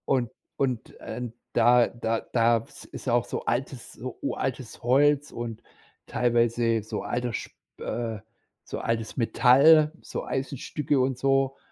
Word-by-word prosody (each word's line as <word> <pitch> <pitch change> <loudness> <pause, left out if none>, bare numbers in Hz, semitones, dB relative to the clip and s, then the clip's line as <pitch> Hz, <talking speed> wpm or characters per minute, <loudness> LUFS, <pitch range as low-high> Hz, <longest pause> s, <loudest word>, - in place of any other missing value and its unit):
Und 125 -3 +1 0.3
und, 130 -4 -1
ähm, 120 -2 -6 0.2
da 120 +1 +5
da 115 -1 -2
da 115 -1 +4
ist 115 - -10
ist - - -6
auch 120 0 +2
so - - -5
altes 120 +1 -3
so 125 +2 -7
uraltes 130 -2 -4
Holz 145 +4 +3
und 115 -2 -6 0.4
teilweise 115 -1 +1
so 110 - -4
alter 120 0 -2
sp - - -5 0.3
äh, 115 -1 -3 0.4
so - - -6
altes 115 -1 -2
Metall, 140 +6 +6
so - - -5
Eisenstücke 140 +1 -2
und 130 0 +1
so. 135 0 +1
120 Hz, 140 wpm, -26 LUFS, 115-135 Hz, 0.4 s, Metall